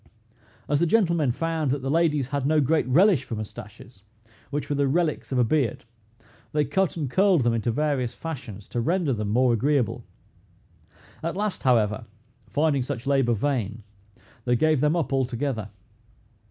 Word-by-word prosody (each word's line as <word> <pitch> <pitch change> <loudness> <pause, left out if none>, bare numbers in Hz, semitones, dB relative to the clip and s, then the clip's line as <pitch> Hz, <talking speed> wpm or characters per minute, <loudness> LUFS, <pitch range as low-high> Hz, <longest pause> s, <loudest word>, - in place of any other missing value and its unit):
As 145 0 +1
the 170 - +2
gentlemen 170 - +2
found 160 +2 -1
that 135 0 -1
the 135 - -1
ladies 150 -5 +1
had 140 -2 -1
no 155 +1 +3
great 150 0 +2
relish 165 - +4
for 115 - -5
mustaches, 105 0 -9 0.5
which 145 0 -3
were 145 - -1
the 140 0 +1
relics 155 +1 0
of 130 - 0
a 125 - +4
beard, 120 -2 0 0.7
they 150 -1 +2
cut 190 0 0
and 150 -4 -2
curled 185 +1 +3
them 120 -1 +2
into 115 +1 -1
various 130 -1 0
fashions, 125 - -7
to 120 - -2
render 170 +1 +1
them 105 -3 -3
more 125 +3 +3
agreeable. 130 -1 0 1.2
At 170 +3 -3
last, 210 -1 -2
however, 110 -4 +2 0.4
finding 145 +3 +1
such 120 -1 -4
labor 135 -4 +2
vain, 115 -3 -2 0.6
they 125 -1 +2
gave 155 +1 +2
them 150 +2 +2
up 165 -5 -1
altogether. 130 -4 -1
140 Hz, 165 wpm, -25 LUFS, 120-155 Hz, 1.2 s, relish